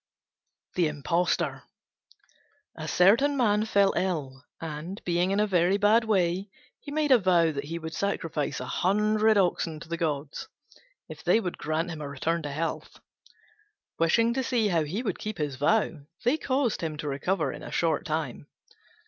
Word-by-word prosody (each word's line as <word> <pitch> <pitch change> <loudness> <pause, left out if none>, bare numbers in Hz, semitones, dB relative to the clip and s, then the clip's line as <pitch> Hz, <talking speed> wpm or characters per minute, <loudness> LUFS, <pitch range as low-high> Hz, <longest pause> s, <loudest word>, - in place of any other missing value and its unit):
THE 175 -3 +2
IMPOSTOR 165 +4 0 1.1
A - - -6
certain 235 +11 +4
man 215 -4 +2
fell 200 -3 +3
ill, 145 -8 -2 0.2
and, 165 +4 -6
being 175 +1 +1
in 195 +1 +1
a 210 - +4
very 185 -1 +2
bad 215 +3 +4
way, 190 -2 +1 0.3
he - - -10
made 300 -1 0
a 255 - +7
vow 175 -4 +3
that 140 -1 -4
he 165 +3 -4
would 160 -1 -6
sacrifice 165 -8 -2
a - - -5
hundred 215 +3 +2
oxen 170 -4 +1
to 160 - -11
the 170 +1 -3
gods 150 -3 -3 0.6
if - - -10
they - - +4
would 180 -6 -4
grant 160 +3 -1
him 155 -2 -6
a 145 - -5
return 165 +5 -1
to 145 -2 -5
health. 160 +4 -4 1.0
Wishing 230 +8 +3
to 265 - 0
see 235 -5 +1
how 165 -4 +1
he 190 +11 -3
would 200 -7 -3
keep 215 -2 -5
his 150 -4 -2
vow, 165 - +1 0.2
they 245 +5 +4
caused 260 -5 0
him 160 -2 -3
to 150 - -5
recover 145 +1 -1
in - - -9
a - - -8
short 165 -3 +1
time. 155 -3 -3
175 Hz, 175 wpm, -27 LUFS, 155-210 Hz, 1.1 s, a